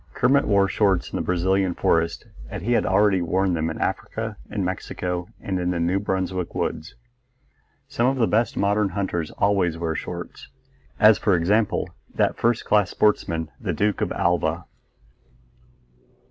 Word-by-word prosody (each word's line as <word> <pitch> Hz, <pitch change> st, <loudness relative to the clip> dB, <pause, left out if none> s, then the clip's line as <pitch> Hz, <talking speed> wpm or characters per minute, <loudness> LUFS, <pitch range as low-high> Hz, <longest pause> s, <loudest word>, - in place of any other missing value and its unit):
Kermit 135 Hz, +3 st, +3 dB
wore 100 Hz, -2 st, +4 dB
shorts 95 Hz, -2 st, +1 dB
in -, -, -5 dB
the -, -, -1 dB
Brazilian 95 Hz, +1 st, +1 dB
forest, 85 Hz, 0 st, 0 dB, 0.2 s
as 80 Hz, -, -6 dB
he 120 Hz, -, -1 dB
had 120 Hz, -, +2 dB
already 95 Hz, 0 st, +3 dB
worn 95 Hz, +2 st, +1 dB
them 80 Hz, -1 st, -1 dB
in 80 Hz, -, -5 dB
Africa, 110 Hz, -1 st, -3 dB
in 100 Hz, -3 st, -2 dB
Mexico, 90 Hz, -1 st, -3 dB
and 95 Hz, -2 st, -3 dB
in 90 Hz, 0 st, -1 dB
the 90 Hz, -1 st, -1 dB
New 85 Hz, +3 st, +1 dB
Brunswick 95 Hz, -2 st, -2 dB
woods. 80 Hz, -, -3 dB, 0.9 s
Some 120 Hz, -, 0 dB
of 135 Hz, +1 st, +1 dB
the 120 Hz, -, +3 dB
best 110 Hz, +1 st, 0 dB
modern 100 Hz, 0 st, +2 dB
hunters 90 Hz, -5 st, -2 dB
always 95 Hz, -5 st, +1 dB
wear 85 Hz, -1 st, -2 dB
shorts; -, -, -7 dB, 0.5 s
as 110 Hz, 0 st, +6 dB
for 100 Hz, -4 st, +2 dB
example, 100 Hz, +5 st, +1 dB, 0.3 s
that -, -, +1 dB
first 120 Hz, 0 st, 0 dB
class 105 Hz, -2 st, +3 dB
sportsman 85 Hz, -6 st, 0 dB
the -, -, -2 dB
Duke 105 Hz, -1 st, 0 dB
of -, -, -1 dB
Alva. 85 Hz, 0 st, 0 dB
95 Hz, 160 wpm, -23 LUFS, 85-105 Hz, 0.9 s, as